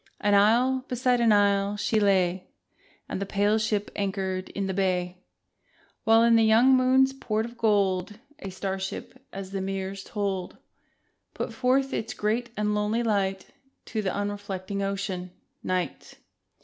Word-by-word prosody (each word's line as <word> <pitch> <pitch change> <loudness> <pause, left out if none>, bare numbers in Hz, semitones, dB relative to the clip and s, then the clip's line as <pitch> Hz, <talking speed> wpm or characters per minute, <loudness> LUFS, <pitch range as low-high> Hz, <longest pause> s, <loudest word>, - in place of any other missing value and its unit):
r 205 - 0
An - - +4
isle 240 +6 +4
beside 250 0 +1
an 230 -2 +4
isle 200 0 +3
she 215 +1 +1
lay, 190 -3 +2 0.6
The 200 - -3
pale 205 +2 +1
ship 210 -1 -1
anchored 190 -2 -2
in 200 - -3
the 190 - -2
bay, 180 -1 -1 0.9
While 225 +1 +6
in 235 0 +5
the 225 - +4
young 230 +4 +5
moon's 260 +1 +4
port 220 -5 -2
of 235 0 -10
gold 205 -3 +1 0.2
A 195 - -6
star 190 +1 -4
ship 225 +7 -7
as 195 -1 -7
the 195 -1 -3
mirrors 195 0 -4
told 195 -4 -3 0.8
Put - - -4
forth 265 +1 +1
its 225 - -3
great 225 +3 -1
and 210 0 0
lonely 210 +3 0
light 195 -4 -1 0.4
To 220 - 0
the 190 -3 -1
unreflecting 200 -1 -4
Ocean, 195 -2 -3 0.3
Night. 185 -1 -3
205 Hz, 150 wpm, -26 LUFS, 190-225 Hz, 0.9 s, While